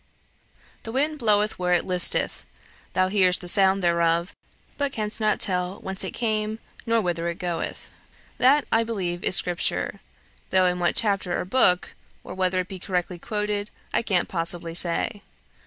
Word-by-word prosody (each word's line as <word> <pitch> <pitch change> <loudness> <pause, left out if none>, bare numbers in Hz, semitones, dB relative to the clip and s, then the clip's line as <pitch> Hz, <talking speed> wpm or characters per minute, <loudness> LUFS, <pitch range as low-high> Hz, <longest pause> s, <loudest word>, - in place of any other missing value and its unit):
"'The 225 - -7
wind 295 +5 0
bloweth 210 -3 +1
where 180 0 +2
it 175 - 0
listeth. 180 -1 +2 0.5
Thou 185 0 +2
hearest 185 -2 +3
the 180 - -9
sound 190 +1 +3
thereof, 170 0 +1 0.4
but 285 -1 -1
canst 215 -2 -4
not 215 -1 +2
tell 180 -1 +1
whence 190 0 -1
it - - -3
cometh, 215 -2 -1 0.3
nor 230 0 +3
whither 170 -4 -2
it 170 0 -3
goeth.' 175 -3 -4 0.5
That, 275 +3 +4
I 225 0 +3
believe, 185 -6 -3
is - - +2
Scripture, 175 -2 +1 0.5
though 185 -1 +3
in 180 0 +1
what 175 -1 +1
chapter 195 -5 +1
or - - -3
book, 180 -4 +2 0.3
or - - -8
whether 185 0 0
it 180 - -8
be 190 -2 -8
correctly 180 -1 -3
quoted, 210 0 -3 0.2
I - - +2
can't 190 -6 0
possibly 170 -1 -2
say. 175 +5 +2
185 Hz, 165 wpm, -24 LUFS, 175-215 Hz, 0.5 s, That